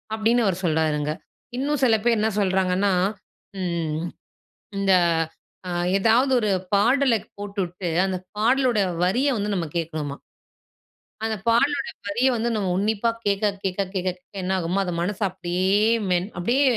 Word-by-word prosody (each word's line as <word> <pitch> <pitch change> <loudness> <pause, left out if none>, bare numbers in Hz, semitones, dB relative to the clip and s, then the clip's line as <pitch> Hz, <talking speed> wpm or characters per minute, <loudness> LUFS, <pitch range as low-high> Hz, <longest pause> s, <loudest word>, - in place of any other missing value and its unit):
"அப்படின்னு 230 +2 +2
அவரு 190 -4 +1
சொல்றாருங்க. 155 -2 +1 0.5
இன்னும் 285 +1 -1
சில 235 -3 +5
பேர் 235 -1 +3
என்னா 220 +1 +1
சொல்றாங்கன்னா, 190 0 +2 0.7
ம் 165 -3 -2 0.7
இந்த 195 -1 +3 0.8
அ - - -3 0.3
எதாவது 230 +6 +3
ஒரு 215 -3 0 0.2
பாடல 240 +5 +4
க் - - -21
போட்டுவிட்டு 195 -3 -4 0.2
அந்த 190 -1 -1 0.2
பாடலோட 245 +1 +2 0.2
வரிய 250 +11 +2
வந்து 205 0 -2
நம்ம 175 -3 -1
கேட்கணுமாம். 155 -4 -4 1.0
அந்த 220 0 0
பாடலோட 235 +5 +2 0.2
வரிய 240 +6 +2
வந்து 235 +1 0
நம்ம 200 -3 -1
உன்னிப்பா 215 +3 +1 0.2
கேட்க, 200 0 0 0.2
கேட்க, 190 +1 -1
கேட்க, 185 -1 -1
கேட்க 180 +2 -9
என்னாகுமா, 185 0 0
அது 180 - -3
மனச 185 +3 -2
அப்படியே 185 +1 0 0.3
மென் 180 +1 +1
அப்படியே 240 +11 +2
200 Hz, 135 wpm, -24 LUFS, 180-230 Hz, 1.0 s, சில